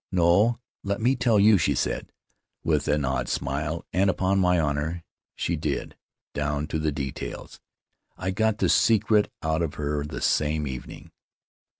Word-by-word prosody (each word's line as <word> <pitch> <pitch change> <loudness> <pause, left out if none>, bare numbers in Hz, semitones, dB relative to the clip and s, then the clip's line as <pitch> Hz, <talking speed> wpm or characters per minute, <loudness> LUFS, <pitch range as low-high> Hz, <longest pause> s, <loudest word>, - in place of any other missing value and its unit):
'No, 95 +7 +3 0.2
let 100 0 -2
me 125 +4 +2
tell 120 -4 +3
you,' 105 -1 +6
she - - +1
said, - - -2 0.5
with 75 -3 +1
an 75 -1 +1
odd 65 -1 -1
smile; 75 +4 -2
and, 95 +3 +3
upon 95 +1 +1
my 90 -2 +3
honor, 80 +2 -1 0.3
she 85 - -1
did 75 -3 -3 0.2
— - - -67
down 75 0 -1
to 80 - -1
the 75 0 0
details! 70 -2 -6 0.6
I 95 - -2
got 110 +2 +1
the - - +1
secret 110 -1 +3
out 80 +1 0
of 80 -3 -2
her 75 0 -2
the 75 - -6
same 75 0 +1
evening. 65 -2 -8
80 Hz, 165 wpm, -26 LUFS, 75-100 Hz, 0.6 s, you